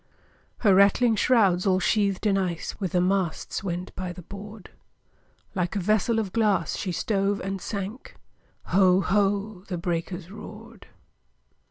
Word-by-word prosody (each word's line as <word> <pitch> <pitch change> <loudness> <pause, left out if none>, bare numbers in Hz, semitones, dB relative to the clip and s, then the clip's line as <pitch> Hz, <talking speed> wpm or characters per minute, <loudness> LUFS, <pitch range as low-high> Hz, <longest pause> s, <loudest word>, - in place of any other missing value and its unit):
Her 205 -4 +5
rattling 205 +4 +5
shrouds, 205 -6 +3
all 185 -1 +3
sheathed 200 +1 +1
in 205 -2 +3
ice, 180 -4 -2
With 190 -2 -3
the 180 - +3
masts 185 -1 -1
went 180 -1 -4
by 185 -1 -4
the 180 0 -10
board; 205 +2 -10 0.8
Like 180 0 -2
a - - +1
vessel 215 +4 +1
of 210 -4 -2
glass, 215 -3 +1
she 185 - -3
stove 200 +2 0
and 195 0 -4
sank, 205 +4 -6 0.6
Ho! 185 0 +5
ho! 200 0 0
the 180 - -3
breakers 170 +1 -4
roared! 220 +2 -11
195 Hz, 145 wpm, -26 LUFS, 185-210 Hz, 0.8 s, Her